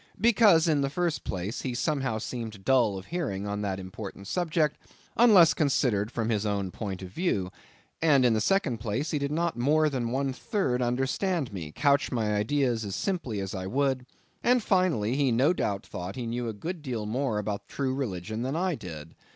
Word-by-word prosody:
Because, 205 -6 +5
in 150 -3 +3
the 140 - 0
first 170 +2 -1
place, 95 +5 -4
he 125 -2 -3
somehow 135 -4 0
seemed 110 -3 -6
dull 120 -7 +3
of 95 - -8
hearing 135 - -3
on 105 0 -3
that 95 -2 -2
important 95 +1 -8
subject, 160 - 0 0.4
unless 210 -8 +7
considered 125 - +1
from 115 -2 -2
his 105 -3 +1
own 100 -3 -1
point 95 -3 -5
of 95 - -7
view; 100 - -1 0.5
and, 145 -5 +5
in 120 - +4
the 110 - +1
second 135 - +1
place, 115 +7 -2
he 150 - 0
did 140 0 -2
not 165 -3 -1
more 150 +4 +3
than 125 -4 -1
one 135 +2 -1
third 130 - -1
understand 135 - 0
me, 80 -6 -6
couch 140 - +2
my 110 -4 0
ideas 115 +2 +1
simply 160 - -2
as 95 -1 -4
I 95 -1 -4
would; 130 +2 0 0.4
and, 245 -1 +3
finally, 170 - +2
he 140 -2 +2
no 130 +9 +3
doubt 100 - -2
thought 90 +3 -6
he 125 - -4
knew 120 +1 -2
a - - -1
good 165 - -5
deal 120 -7 -3
more 120 +1 -1
about 105 -1 -3
the - - -17
true 135 -2 0
religion 110 -4 -3
than 130 +4 -2
I 180 +2 +1
did. 80 - -8
125 Hz, 195 wpm, -28 LUFS, 105-150 Hz, 0.5 s, unless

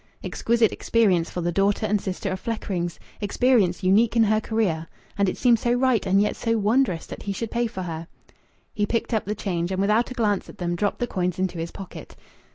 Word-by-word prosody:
Exquisite 230 -1 +1
experience 190 -8 +2
for 180 - -4
the 175 +1 0
daughter 200 +4 +1
and 210 -1 +1
sister 190 -1 -3
of 190 - -3
Fleckrings! 180 -7 -3 0.2
Experience 205 -4 +2
unique 215 +5 +4
in 230 - +5
her 215 0 +2
career! 195 -9 -1 0.3
And 200 -1 +2
it - - -4
seemed 240 -3 +4
so 240 +1 +1
right 245 -4 +2
and 195 +1 +4
yet 210 - +1
so 230 -1 0
wondrous, 215 -4 +1
that - - -9
he 200 - -3
should 220 +3 -4
pay 240 0 +1
for 190 -4 -6
her!... 165 -1 -5 0.7
He 205 -1 0
picked 230 +2 -1
up 220 - 0
the 210 +2 -2
change, 180 -4 -2
and 190 - -1
without 210 +4 +2
a 255 - -7
glance 210 -5 0
at - - -12
them 175 -1 -2
dropped 205 +3 0
the 245 - -1
coins 180 -6 -2
into 185 -2 -2
his 165 +1 -3
pocket. 195 +1 -10
205 Hz, 220 wpm, -24 LUFS, 185-230 Hz, 0.7 s, in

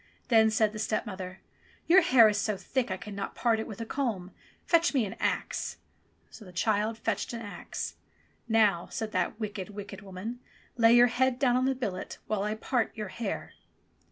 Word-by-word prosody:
Then 220 -2 +6
said 215 -1 +2
the 215 - -6
stepmother, 190 -4 -3 0.4
"Your 370 +3 +7
hair 250 -9 +7
is 210 -1 +1
so 210 -1 -1
thick 255 +4 -1
I 185 - -2
cannot 200 0 -6
part 230 -2 +2
it 220 - -4
with 215 -2 -8
a - - -3
comb; 220 -8 -2 0.3
fetch 335 -3 +3
me 250 -5 +3
an 195 - -6
axe - - -1 0.3
!" - - -39
So 220 - -12
the 185 - -12
child 215 +4 0
fetched 225 - -2
an 230 - -5
axe. 205 -2 -6 0.5
Now," 210 -6 +3
said 220 -1 -4
that 185 +3 -1
wicked, 205 -3 -4
wicked 200 -1 -8
woman, 200 +5 -6 0.4
"lay 230 0 +6
your 240 0 +8
head 245 +1 +1
down 250 -2 +3
on 255 +1 +2
the 265 0 +1
billet 205 -8 -4
while 215 -2 -1
I 210 +1 -1
part 235 +1 -1
your 210 -3 -4
hair." 220 0 -4
220 Hz, 190 wpm, -29 LUFS, 200-240 Hz, 0.5 s, your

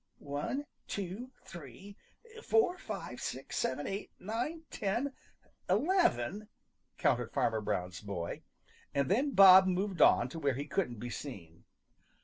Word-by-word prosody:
"One, 145 - -3 0.2
two, 200 +6 -5
three, 175 - -11 0.5
four, 435 -5 +2
five, 195 - -6
six, 130 +1 -5
seven, 145 +3 -1
eight, 195 +1 -4
nine, 245 - -3
ten, 235 +8 -1 0.6
eleven," 210 - +2 0.5
counted - - +1
Farmer 110 -1 +1
Brown's 90 -4 -3
boy, 95 -5 -5 0.5
and 140 -1 +1
then 270 +7 +1
Bob 190 -1 +9
moved 185 0 -1
on 120 - +6
to 165 - -7
where 140 -4 +1
he 140 +2 -4
couldn't 145 -4 -1
be 120 +3 -6
seen. 85 - -8
180 Hz, 130 wpm, -32 LUFS, -, 0.6 s, Bob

